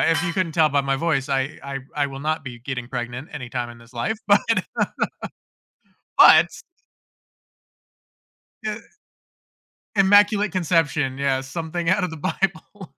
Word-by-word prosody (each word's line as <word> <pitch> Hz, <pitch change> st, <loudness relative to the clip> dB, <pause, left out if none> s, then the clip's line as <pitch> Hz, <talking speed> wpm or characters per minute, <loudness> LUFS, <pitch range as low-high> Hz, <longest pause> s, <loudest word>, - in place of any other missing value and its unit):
if 165 Hz, -2 st, +2 dB
you 170 Hz, -, -1 dB
couldn't 175 Hz, -2 st, -1 dB
tell 155 Hz, -1 st, +4 dB
by 145 Hz, -1 st, +2 dB
my 135 Hz, 0 st, 0 dB
voice, 145 Hz, -2 st, 0 dB
I 135 Hz, +2 st, -1 dB
I 140 Hz, 0 st, -5 dB, 0.2 s
I 145 Hz, -1 st, +1 dB
will 135 Hz, 0 st, -8 dB
not 155 Hz, +1 st, -1 dB
be 120 Hz, -3 st, -8 dB
getting 125 Hz, -1 st, -5 dB
pregnant 125 Hz, +2 st, -5 dB
anytime 125 Hz, -3 st, -5 dB
in 120 Hz, -, -13 dB
this 115 Hz, +1 st, -18 dB
life, 120 Hz, -, -2 dB
but 205 Hz, 0 st, +5 dB, 1.8 s
but -, -, +8 dB, 2.2 s
Y 215 Hz, -, -2 dB, 1.3 s
Immaculate 205 Hz, +1 st, +4 dB
Conception, 155 Hz, -6 st, +1 dB
yeah, 135 Hz, -1 st, 0 dB
something 165 Hz, +5 st, -3 dB
out 185 Hz, +1 st, +2 dB
of 180 Hz, -, -1 dB
the 160 Hz, -, -8 dB
Bible. 185 Hz, +1 st, -3 dB
145 Hz, 140 wpm, -23 LUFS, 130-175 Hz, 2.2 s, but